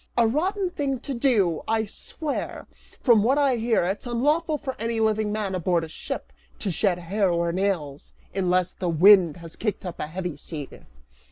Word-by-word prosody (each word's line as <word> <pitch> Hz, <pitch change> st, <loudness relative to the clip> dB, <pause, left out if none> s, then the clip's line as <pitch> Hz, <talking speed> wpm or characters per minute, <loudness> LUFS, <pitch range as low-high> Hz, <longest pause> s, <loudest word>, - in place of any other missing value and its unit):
"A 235 Hz, -, +5 dB
rotten 365 Hz, -, 0 dB
thing 275 Hz, -5 st, -2 dB
to 275 Hz, -, -4 dB
do, 220 Hz, -, +2 dB
I 220 Hz, 0 st, +1 dB
swear! 290 Hz, +8 st, -5 dB, 0.4 s
From 235 Hz, -5 st, +5 dB
what 255 Hz, +7 st, +3 dB
I 275 Hz, -4 st, +3 dB
hear, 230 Hz, -3 st, +2 dB
it's 195 Hz, +7 st, -2 dB
unlawful 300 Hz, +7 st, +1 dB
for 270 Hz, -3 st, -5 dB
any 230 Hz, 0 st, -1 dB
living 220 Hz, -1 st, +1 dB
man 210 Hz, -2 st, -2 dB
aboard 170 Hz, -3 st, 0 dB
ship -, -, -6 dB, 0.2 s
to 200 Hz, -, -2 dB
shed 180 Hz, +1 st, +1 dB
hair 190 Hz, +3 st, 0 dB
or 170 Hz, 0 st, +1 dB
nails, 170 Hz, -7 st, -2 dB, 0.2 s
unless 185 Hz, -1 st, +1 dB
the 180 Hz, -, -3 dB
wind 175 Hz, -1 st, +6 dB
has 165 Hz, -1 st, -10 dB
kicked 210 Hz, -3 st, -3 dB
up 180 Hz, -, -6 dB
a -, -, -3 dB
heavy 175 Hz, -1 st, -5 dB
sea." 145 Hz, -2 st, -6 dB
205 Hz, 175 wpm, -25 LUFS, 175-240 Hz, 0.4 s, wind